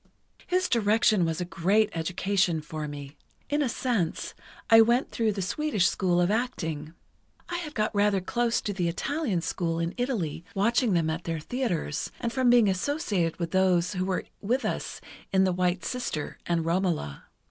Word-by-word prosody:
"His 365 0 +1
direction 215 -4 +3
was 160 -1 -2
a 180 - -2
great 200 +5 +2
education 180 +1 0
for 150 0 -5
me. 145 0 -8 0.3
In 295 +1 +2
a 275 - +1
sense, 230 -9 -1 0.3
I 225 -1 +8
went 240 +4 +2
through 225 -2 +1
the 195 -1 -3
Swedish 215 -1 0
school 180 -2 +2
of 175 +2 +3
acting. 165 -10 -2 0.5
I 350 - -2
had 305 -3 -7
got 215 -1 0
rather 205 -1 +3
close 235 +5 0
to 205 - -3
the 180 -3 -1
Italian 225 - -1
school 165 0 -2
in 170 +1 -1
Italy, 215 - -2
watching 230 +2 +2
them 165 -2 +2
at 165 +2 -5
their 165 -1 -2
theatres, 175 - -2
and 235 -1 -2
from 255 0 +3
being 240 -3 +6
associated 195 - 0
with 170 -1 -3
those 185 0 +2
who 185 -1 -1
were 185 -1 -1 0.2
with 245 +6 0
us - - -3 0.3
in 190 0 +4
'The 185 -1 +2
White 180 0 0
Sister' 245 - -3
and 170 -2 0
'Romola. 170 - -1
190 Hz, 175 wpm, -27 LUFS, 170-235 Hz, 0.5 s, I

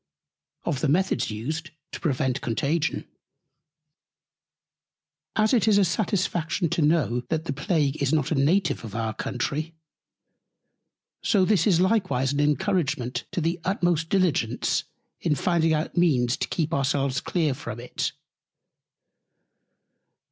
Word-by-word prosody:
OF 135 - -1
THE 155 - +2
METHODS 185 +7 +1 0.6
TO - - -6
PREVENT 130 -3 0
CONTAGION. 145 +7 -1 2.3
As 215 +2 +3
it 225 -3 +3
is 210 -2 +5
a 200 - +5
satisfaction 175 -1 0
to 165 - 0
know, 145 -6 +2
that 160 0 -1
the 140 - -2
Plague 150 -1 0
is 140 -1 +1
not 150 -2 +1
a - - +4
Native 160 +5 +2
of 110 -2 -8
our 110 -1 -1
Country, 155 +8 -3 1.5
so 195 -4 +3
this 195 -3 +3
is 175 -5 +4
likewise 185 - +1
an 145 - -1
Encouragement 150 - 0
to 175 - -2
the 165 +2 -1
utmost 175 -3 0
Diligence 160 - +1 0.3
in 155 -3 +1
finding 165 +1 +1
out 155 0 -1
Means 135 -8 +3
to - - -2
keep 165 -1 -1
our 140 - +1
selves 135 -1 0
clear 160 -6 0
from 120 -5 -7
It. 125 - -3
155 Hz, 130 wpm, -25 LUFS, 135-175 Hz, 2.3 s, is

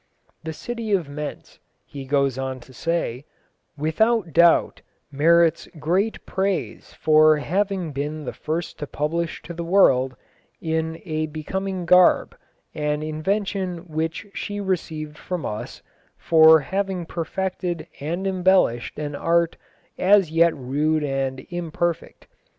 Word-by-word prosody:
"The 160 - -4
city 230 +5 -4
of 180 -6 +1
Mentz," 150 +1 -7 0.3
he 140 -2 -8
goes 140 -1 +1
on 130 0 -4
to 130 +2 -16
say, 140 -3 -2 0.5
"without 170 +4 +1
doubt 170 0 +4 0.3
merits 165 +3 +3
great 185 +8 -1
praise 190 -1 -2
for 155 0 +5
having 185 +2 -1
been 145 +2 -4
the - - -4
first 160 +1 -4
to 150 - -4
publish 160 +4 -2
to 170 - -8
the 170 0 -5
world, 135 -8 +3 0.4
in 160 0 -2
a 155 -1 -2
becoming 185 +4 -4
garb, 180 +1 +5 0.4
an 150 0 -1
invention 185 +2 -2
which 160 +5 -3
she 205 0 -4
received 160 -6 -3
from 180 -4 -4
us, 105 - -6 0.3
for 160 -1 +6
having 190 +2 -2
perfected 175 0 -3
and 170 +6 -3
embellished 185 -10 +2
an 145 -1 -4
art 170 +3 +1 0.4
as 195 -3 +4
yet 165 0 +4
rude 150 +4 0
and 135 -2 -2
imperfect.... 175 -1 -3
160 Hz, 125 wpm, -23 LUFS, 150-180 Hz, 0.5 s, for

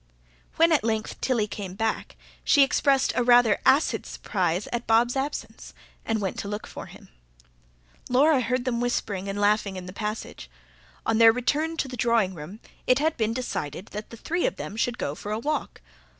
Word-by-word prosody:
When 330 +1 +4
at 305 -7 +3
length 220 -1 -2
Tilly 240 -5 +1
came 195 -3 -7
back, 220 +1 -2 0.3
she 285 - +5
expressed 275 0 +2
a - - +2
rather 240 -3 +5
acid 280 +4 +3
surprise 185 -1 -2
at 240 0 -3
Bob's 235 +3 +3
absence, 275 +2 -5 0.3
and 225 -1 -1
went 195 -3 -3
to - - -4
look 210 +1 -4
for - - -9
him; - - -15 1.0
Laura 270 +2 +4
heard 250 +1 -1
them 240 -2 -1
whispering 200 -5 -2
and 200 +1 -3
laughing 205 -1 +2
in 185 -1 -7
the 185 - -9
passage. 210 +1 -5 0.6
On 225 0 +1
their 225 0 +9
return 295 +7 -1
to 280 - -1
the 255 - -7
drawing 230 -5 +2
room 175 +6 -9 0.3
it 255 - +5
had 315 +2 +1
been 225 0 -1
decided 190 - -4
that 210 +1 -6
the 230 - -10
three 345 +9 -1
of - - -3
them 205 - -7
should 240 +2 -1
go 140 - -2
for 205 +7 -7
a 215 - 0
walk. 300 +7 -3
225 Hz, 190 wpm, -26 LUFS, 205-255 Hz, 1.0 s, their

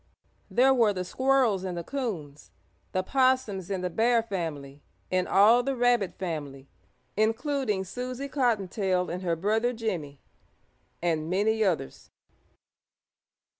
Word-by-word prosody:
There 265 +2 +4
were 230 -5 +3
the 185 -1 -4
Squirrels 255 -4 +2
and 180 -2 -4
the 170 - -4
Coons, 170 - -5 0.4
the 185 - 0
Possums 255 -6 +1
and 190 -2 -2
the 180 - 0
Bear 230 +4 +3
family 150 -9 -5 0.3
and 185 0 +1
all 220 +5 +6
the 270 +2 -2
Rabbit 240 -5 +2
family, 145 -7 -5 0.5
including 225 -1 0
Susie 250 +7 -5
Cottontail 200 - 0
and 180 +1 -4
her 170 -3 0
brother 220 +8 0
Jimmie 175 - -4 0.8
and 160 -2 0
many 215 +4 +2
others. 170 - -2
200 Hz, 125 wpm, -27 LUFS, 180-245 Hz, 0.8 s, all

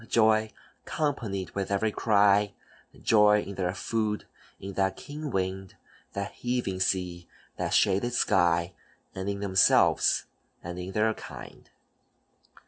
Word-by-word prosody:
Joy 110 -1 +3 0.3
companied 115 - -2
with 100 -1 -3
every 100 +2 +1
cry, 105 -2 +3 0.5
Joy 105 -1 +5
in 100 - -7
their 95 -1 -2
food, 110 -1 -2 0.3
in 95 +1 -7
that 95 0 0
keen 150 +1 -7
wind, 95 -2 -3 0.4
That 100 0 -4
heaving 120 -7 -2
sea, 90 -2 -1 0.3
that - - -1
shaded 100 +5 +2
sky, 85 -6 +2 0.4
And 95 +1 -4
in 100 0 -3
themselves, 95 -2 +3 0.4
and 90 +1 -6
in 90 +2 -6
their 110 +1 +2
kind. - - -11
100 Hz, 125 wpm, -28 LUFS, 95-110 Hz, 0.5 s, Joy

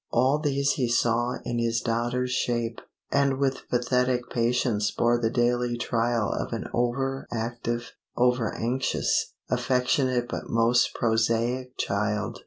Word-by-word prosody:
All 130 +5 +2
these 140 -2 +1
he 125 -4 0
saw 120 +1 +1
in 120 - -2
this 115 0 +1
daughter's 120 +2 -1
shape; 120 -2 -1 0.3
and 140 -1 +2
with 135 -1 -1
pathetic 125 0 0
patience 115 -3 +1
bore 120 0 +2
the 115 -1 +1
daily 120 0 +1
trial 115 -2 0
of - - -3
an - - -4
over 135 +3 -1
active, 120 +1 -3 0.3
over 125 -2 +2
anxious, 125 +3 0 0.2
affectionate 125 -1 +1
but - - -5
most 115 +2 +3
prosaic 115 +3 0
child. 105 +1 -1
120 Hz, 130 wpm, -26 LUFS, 115-125 Hz, 0.3 s, most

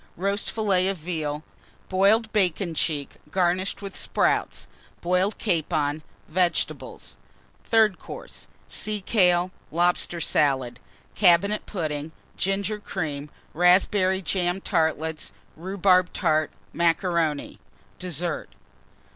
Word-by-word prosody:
Roast 200 +3 -1
Fillet 195 -4 +1
of 195 -1 -1
Veal. 155 -3 -3 0.4
Boiled 210 +4 +3
Bacon 185 -3 +1
cheek 150 -2 -2
garnished 185 +3 0
with 195 - -7
Sprouts. - - 0 0.3
Boiled 180 +4 +1
Capon. 155 -5 0 0.3
Vegetables. 175 +1 -1 0.5
THIRD 220 -5 +3
COURSE. - - -9 0.2
Sea 215 0 -2
kale. 180 -3 +3 0.2
Lobster 175 +1 +1
Salad. 130 -6 +1 0.3
Cabinet 200 +2 +3
Pudding. 155 -4 -3 0.2
Ginger 200 +2 -1
Cream. 150 -8 -4 0.2
Raspberry 185 +2 +3
Jam 180 +1 0
Tartlets. 160 -2 -1 0.2
Rhubarb 185 +1 +2
Tart. 155 -3 +1 0.2
Macaroni. 170 -3 0 0.4
DESSERT. 175 -2 -3
180 Hz, 95 wpm, -25 LUFS, 160-195 Hz, 0.5 s, Boiled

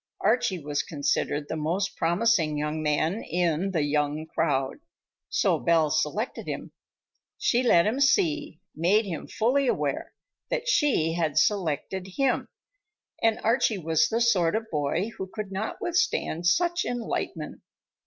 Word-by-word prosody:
Archie 210 -3 +2
was 145 -2 -2
considered 145 0 -1
the - - -3
most 165 +6 -1
promising 170 -3 +2
young 150 +1 -2
man 155 +7 0
in 175 +1 0
"the 165 -6 0
young 150 +1 0
crowd," 145 -5 -1 0.5
so - - +2
Belle 165 -3 +2
selected 210 - -1
him. - - -5 0.7
She 245 - +2
let 175 -9 +4
him 225 +6 0
see, 305 +1 +2 0.2
made 195 +7 +3
him 170 -5 -5
fully 260 +5 +1
aware, - - -1 0.3
that - - -2
she 275 - +2
had 160 -3 -1
selected 190 0 0
him, 270 -2 +1 0.7
and 225 -1 +2
Archie 225 -2 +2
was 160 -2 +2
the 230 +1 -1
sort 190 -8 +3
of 220 0 -3
boy 160 +8 -1
who 190 - -4
could 210 -3 -6
not 195 +3 -4
withstand 175 - 0
such 345 - +2
enlightenment. 220 -9 -4
180 Hz, 140 wpm, -26 LUFS, 155-230 Hz, 0.7 s, let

